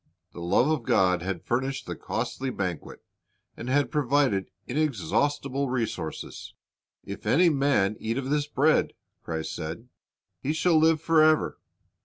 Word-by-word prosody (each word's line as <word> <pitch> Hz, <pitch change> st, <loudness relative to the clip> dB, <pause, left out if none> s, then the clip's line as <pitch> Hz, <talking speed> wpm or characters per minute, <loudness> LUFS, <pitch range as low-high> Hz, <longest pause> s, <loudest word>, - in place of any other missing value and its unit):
The 85 Hz, -, -9 dB
love 85 Hz, +9 st, +3 dB
of 155 Hz, -3 st, +1 dB
God 90 Hz, -5 st, +2 dB
had 90 Hz, -2 st, -4 dB
furnished 130 Hz, +3 st, -1 dB
the -, -, -5 dB
costly 135 Hz, 0 st, -3 dB
banquet, 90 Hz, -9 st, -5 dB, 0.5 s
and 120 Hz, -, -6 dB
had 140 Hz, +2 st, +2 dB
provided 140 Hz, -8 st, +1 dB, 0.2 s
inexhaustible 140 Hz, -, 0 dB
resources. 115 Hz, -10 st, -4 dB, 0.5 s
"If -, -, -7 dB
any 175 Hz, +4 st, +5 dB
man 135 Hz, -9 st, +2 dB
eat 115 Hz, +2 st, -2 dB
of 135 Hz, 0 st, -3 dB
this 150 Hz, -1 st, +1 dB
bread," 150 Hz, +2 st, +2 dB, 0.3 s
Christ 80 Hz, -1 st, -4 dB
said, 85 Hz, +11 st, -6 dB, 0.5 s
"he 145 Hz, -, -1 dB
shall 160 Hz, 0 st, +3 dB
live 160 Hz, 0 st, +4 dB
forever." 155 Hz, -1 st, +3 dB
135 Hz, 135 wpm, -27 LUFS, 100-150 Hz, 0.5 s, any